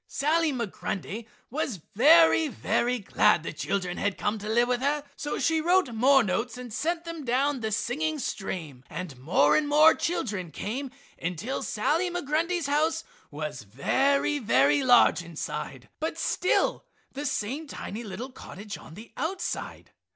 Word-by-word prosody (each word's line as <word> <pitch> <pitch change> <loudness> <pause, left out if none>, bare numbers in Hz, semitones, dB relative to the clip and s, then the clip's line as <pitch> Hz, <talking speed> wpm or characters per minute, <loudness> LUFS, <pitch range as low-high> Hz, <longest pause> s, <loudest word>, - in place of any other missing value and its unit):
Sally 315 +3 +1
Migrundy 215 -2 -4 0.2
was 260 - -2 0.2
very, 320 +6 +6
very 250 -2 0
glad 190 -5 +2
the - - -5
children 180 +2 -2
had 200 -1 -1
come 210 +1 -1
to 210 +1 -6
live 240 +2 +3
with 250 0 0
her, 290 +2 0
so 295 - -3
she 320 -1 +1
wrote 350 -6 +2
more 265 +4 +5
notes 230 +4 -2
and 250 -3 -8
sent 335 +7 -1
them 335 -2 -6
down 265 +3 +1
the 220 -2 -3
singing 305 +9 -1
stream, 175 - -5
and 175 -7 -6
more 145 +1 +3
and 305 - +2
more 305 +2 +7
children 210 - -2
came 255 - -4 0.3
until 180 +10 -3
Sally 320 - 0
Migrundy's 340 +1 -1
house 310 +3 +1 0.3
was 150 +1 -5
very, 270 - +1
very 145 - +3
large 245 -7 +5
inside, 170 -3 -6
but - - -3
still 365 - +1 0.3
the 290 +2 -4
same 270 +5 -3
tiny 230 -4 -6
little 235 +5 -6
cottage 205 -4 -9
on 160 - -13
the 220 +4 -12
outside. 340 +7 -4
250 Hz, 150 wpm, -27 LUFS, 200-300 Hz, 0.3 s, more